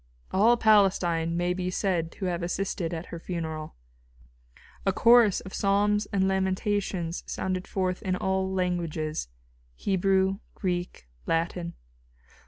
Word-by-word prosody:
All 225 +5 +4
Palestine 180 -6 +3
may 175 +1 +1
be 180 0 -2
said 180 -3 -1
to 195 - -5
have 175 -1 -1
assisted 175 -1 -2
at 165 0 -4
her 170 - -5
funeral. 160 -3 -5 1.1
A 195 - +2
chorus 230 0 +5
of 190 - -10
psalms 205 +1 +2
and 190 -1 +1
lamentations 190 -2 -1
sounded 185 -1 -3
forth 185 -1 -1
in 185 -1 -1
all 190 0 0
languages 170 - -2 0.5
Hebrew, 190 - +1 0.2
Greek, 175 - -3 0.2
Latin. 170 +1 -1
185 Hz, 120 wpm, -27 LUFS, 170-195 Hz, 1.1 s, chorus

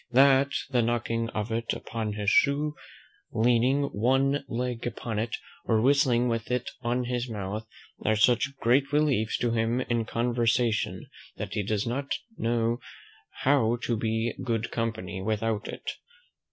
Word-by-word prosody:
"That 135 +2 +5 0.2
the 125 -2 +3
knocking 115 0 0
of 110 -1 -3
it 115 +1 -1
upon 110 -2 -4
his 105 0 0
shoe, 145 +2 +3 0.6
leaning 125 +5 +3
one 135 +4 +1
leg 120 -1 -2
upon 115 -2 -3
it, 115 +1 -1 0.3
or 110 -2 +3
whistling 125 -1 +3
with 115 -2 -2
it 125 0 -1
on 125 +1 0
his 125 0 -2
mouth, 105 +1 -4 0.4
are 110 - +3
such 120 +5 +3
great 135 +4 +2
reliefs 145 -8 +2
to 120 - 0
him 115 +2 +1
in 120 -2 -1
conversation, 115 -1 0 0.3
that - - -5
he 105 - 0
does 105 0 -1
not 135 +4 -2 0.2
know 115 +1 0 0.6
how 130 -4 +3
to 120 - 0
be 115 +1 -1
good 115 -2 -1
company 110 -5 -3
without 110 +1 -1
it. - - -8
115 Hz, 145 wpm, -28 LUFS, 110-125 Hz, 0.6 s, That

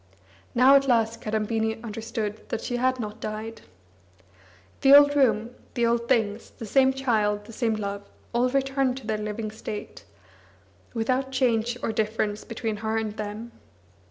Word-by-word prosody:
Now 255 +3 +7
at 275 0 +4
last 230 -2 +2
Kadambini 220 +1 -1
understood 220 -1 -5
that 230 - -2
she 245 - -2
had 255 +1 +1
not 215 -1 -5
died. 220 +1 -5 1.2
The 275 +1 +8
old 290 0 +5
room, 230 -4 +2 0.2
the 240 - +2
old 235 0 +1
things, 225 -4 0
the 225 - -6
same 265 +4 +4
child, 215 -6 0
the 225 - -11
same 225 -1 0
love, 200 -1 -5 0.2
all 245 +2 +2
returned 270 -1 0
to 265 - -9
their 215 -1 -1
living 215 +1 -4
state, 215 -1 -7 0.9
without 255 +4 0
change 240 -2 +1
or - - 0
difference 215 -1 -1
between 225 -2 -4
her 220 +1 -2
and 215 -1 -2
them. 215 +2 -6
225 Hz, 155 wpm, -26 LUFS, 215-250 Hz, 1.2 s, The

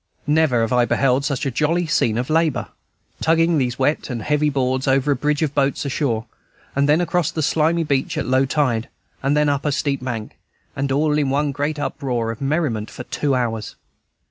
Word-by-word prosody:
Never 150 -5 +3
have 115 +1 0
I 125 -1 +4
beheld 135 +2 +1
such 140 -3 -1
a 135 - 0
jolly 165 +7 +1
scene 115 -8 +1
of 125 +5 -2
labor. 160 -5 +1 0.5
Tugging 165 0 +3
these 125 -2 -1
wet 145 +4 0
and 120 -4 -4
heavy 150 +2 +1
boards 130 -1 -1
over 135 +2 +2
a - - +3
bridge 150 +4 0
of 150 -2 -1
boats 140 0 0
ashore, 125 -5 -1 0.5
then 145 +3 +3
across 175 -2 +1
the 160 -3 -2
slimy 160 +3 +2
beach 140 -3 -1
at - - -1
low 130 +1 +2
tide, 130 -4 0 0.3
then 150 +2 +2
up 140 -1 0
a 150 - 0
steep 140 -2 -1
bank, 115 -4 -5 0.4
and 135 0 -2
all 150 +2 +2
in 140 -2 +1
one 145 +1 +1
great 145 +2 -2
uproar 125 -5 -2
of 115 - -9
merriment 135 -7 -1
for - - -8
two 140 -3 -1
hours. 115 -4 -2
140 Hz, 195 wpm, -21 LUFS, 125-150 Hz, 0.5 s, I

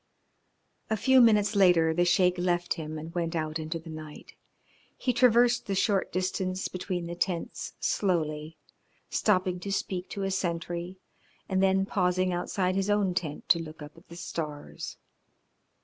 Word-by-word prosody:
A 220 - +1
few 260 +4 +5
minutes 210 -2 +4
later 175 -5 +5
the 175 +2 +2
Sheik 180 0 +3
left 175 -1 +1
him 155 -2 -6
and 160 +2 -8
went 170 -1 -2
out 155 0 -2
into 160 +1 -3
the 165 0 -10
night. 155 -1 -10 0.6
He 250 - 0
traversed 240 0 +4
the 195 - -1
short 195 0 +1
distance 185 0 -1
between 185 -1 -4
the 170 - -5
tents 175 0 -3
slowly, 160 -5 -1 0.5
stopping 185 -3 +1
to 195 +2 -5
speak 185 -2 -2
to 200 - -4
a 195 - -1
sentry, 175 0 -3 0.5
and 190 -1 +1
then 195 0 +3
pausing 185 -1 +1
outside 185 +1 -1
his 195 +1 0
own 205 -3 +2
tent 160 -5 -4
to 170 - +6
look 155 -2 -8
up 150 0 -11
at 165 - -18
the 170 - -10
stars. 155 -3 -6
180 Hz, 160 wpm, -28 LUFS, 165-195 Hz, 0.6 s, to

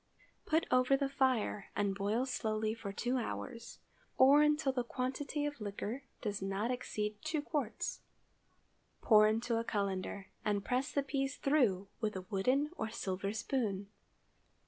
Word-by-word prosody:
Put 320 +1 +3
over 255 +2 +5
the 275 0 0
fire, 260 -7 +1
and 200 -1 +1
boil 205 +5 0
slowly 220 -4 -1
for 220 -3 -6
two 245 +6 -1
hours, 235 0 -5 0.4
or 275 +3 +8
until 300 -2 +3
the 250 -2 -1
quantity 265 +4 -2
of 290 -4 -4
liquor 210 +6 -4 0.2
does 205 -2 -2
not 195 +5 -1
exceed 210 -4 -3
two 310 0 -1
quarts. 290 -6 -2 1.0
Pour 215 -2 +7
into 225 +2 +1
a - - -1
cullender, 200 -2 -2 0.2
and 205 -1 0
press 255 +3 0
the 280 - +1
peas 270 0 -1
through 250 -10 +3
it 200 - -29
with 215 -2 -1
a 185 -1 -5
wooden 255 +10 +2
or 220 - -2
silver 195 -3 -2
spoon. 215 -3 -2
230 Hz, 150 wpm, -34 LUFS, 205-270 Hz, 1.0 s, or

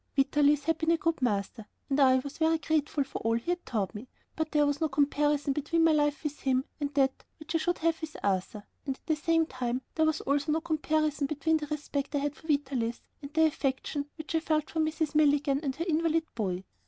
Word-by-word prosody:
Vitalis 290 +1 +3
had 325 +2 0
been 320 - 0
a 335 - +4
good 330 -2 -1
master, 210 -1 -1 0.2
and 275 +1 0
I 260 -2 +6
was 275 +4 -3
very 325 0 +3
grateful 300 -2 0
for 270 - -6
all 225 +1 +1
he 235 +9 -2
had 355 0 -2
taught 210 -5 -1
me, 220 +4 -8 0.3
but 315 -1 -2
there 295 -1 +4
was 285 +1 -1
no 315 - +2
comparison 290 0 +1
between 315 +4 +1
my 325 - +5
life 295 -1 +1
with 295 -1 -4
him 260 0 +1
and 290 -1 -2
that 270 -2 +2
which 315 0 -7
I 330 - +2
should 350 +2 0
have 330 0 0
with 315 -1 -6
Arthur, 200 +1 -1 0.2
and 270 - -1
at - - -38
the 315 - +1
same 325 +2 +2
time, 255 -2 -3
there 315 -1 +2
was 315 0 0
also 290 +2 +1
no 320 - 0
comparison 310 -2 0
between 310 +2 +1
the 300 -1 -5
respect 290 -1 -3
I - - +3
had 290 +1 -1
for 320 - -15
Vitalis 265 -6 -1 0.2
and 280 0 -8
the 320 +1 +4
affection 285 0 -1
which 315 0 -6
I 325 - +3
felt 310 -2 -1
for 320 - -2
Mrs. 315 0 0
Milligan 290 -2 +3
and 275 -4 -2
her 335 - -3
invalid 330 0 +2
boy. 190 -5 -2
295 Hz, 230 wpm, -29 LUFS, 270-315 Hz, 0.3 s, I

